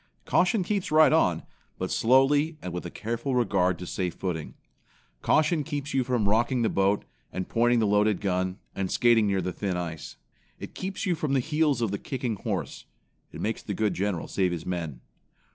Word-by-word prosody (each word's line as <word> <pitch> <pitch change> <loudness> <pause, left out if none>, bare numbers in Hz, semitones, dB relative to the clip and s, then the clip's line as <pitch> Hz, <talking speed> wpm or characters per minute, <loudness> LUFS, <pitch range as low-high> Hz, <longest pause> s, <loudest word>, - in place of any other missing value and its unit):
Caution 185 +2 +2
keeps 195 -1 -2
right 155 0 +6
on, 90 - +2 0.3
but - - -3
slowly 145 +6 +3
and 90 -8 -6
with 90 0 -4
a - - -7
careful 115 +7 -3
regard 95 -7 +2
to 90 - -7
safe 90 -1 -3
footing. 85 -5 -4 0.7
Caution 155 0 +2
keeps 145 0 -4
you 135 -1 +2
from 120 -4 0
rocking 120 +4 +2
the 110 - +2
boat, 100 +1 +1 0.3
and 95 - -4
pointing 120 +1 +2
the 115 - +2
loaded 105 -1 +2
gun, 95 -1 -1 0.2
and 95 -1 -2
skating 115 -3 +4
near 95 -1 +1
the 90 0 -3
thin 95 -3 -2
ice. 85 -3 -5 0.4
It - - -8
keeps 190 0 -4
you 185 - +2
from 155 -4 -2
the 135 - +3
heels 150 -2 +1
of 110 - 0
the 100 - -3
kicking 125 -5 -3
horse. 95 - -4 0.5
It - - -8
makes 110 +1 -2
the 100 - -5
good 110 0 +1
general 95 -3 -2
save 95 -2 0
his 85 -2 -4
men. 80 -8 -4
110 Hz, 195 wpm, -27 LUFS, 95-135 Hz, 0.7 s, right